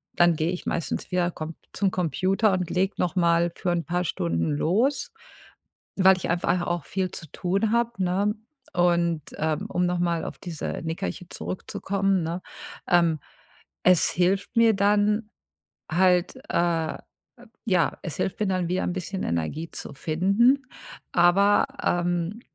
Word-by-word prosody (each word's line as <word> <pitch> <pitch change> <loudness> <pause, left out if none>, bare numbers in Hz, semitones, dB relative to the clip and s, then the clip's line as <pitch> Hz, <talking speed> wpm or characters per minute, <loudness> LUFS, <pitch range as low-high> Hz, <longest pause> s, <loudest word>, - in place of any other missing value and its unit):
dann 175 -1 +4
gehe 160 +2 0
ich 180 - -5
meistens 170 - -3
wieder 180 -1 +1
Com 155 0 -6 0.2
zum 195 -2 0
Computer 185 +4 +1
und 185 -2 -1
lege 190 +2 0
noch 180 +1 -1
mal 170 -1 +3
für 180 - -1
'n 170 -1 -1
paar 180 +1 -1
Stunden 85 - -1
los, 235 - +1 0.8
weil 190 -1 +6
ich 185 - -4
einfach 175 +1 +1
auch 175 -3 -2
viel 185 -1 -2
zu 160 - -8
tun 195 +4 0
habe, 235 0 +2
ne? 200 +4 +1 0.4
Und, 170 -2 +2 0.2
ähm, 155 0 -1
um 180 - +1
noch 175 0 0
mal 170 -2 0
auf - - -6
diese 170 -5 -5
Nickerchen 170 +2 -4
zurückzukommen, 195 0 -2
ne? 170 +3 -3 0.5
Ähm, 170 -3 +3 0.6
es 180 -2 +5
hilft 185 +5 0
mir 230 -1 +6
dann 210 +2 +2 0.6
halt, 180 +3 +3
äh 165 -2 0 0.7
ja, 185 -6 +1
es 165 -6 -4
hilft 190 - -2
mir 210 - +1
dann 185 -2 0
wieder 180 +1 0
ein 180 - -1
bisschen 190 +1 -4
Energie 85 - -2
zu - - -7
finden, 200 - +2 0.5
aber, 195 +7 +4 0.2
ähm, 175 +4 0
180 Hz, 150 wpm, -25 LUFS, 170-195 Hz, 0.8 s, weil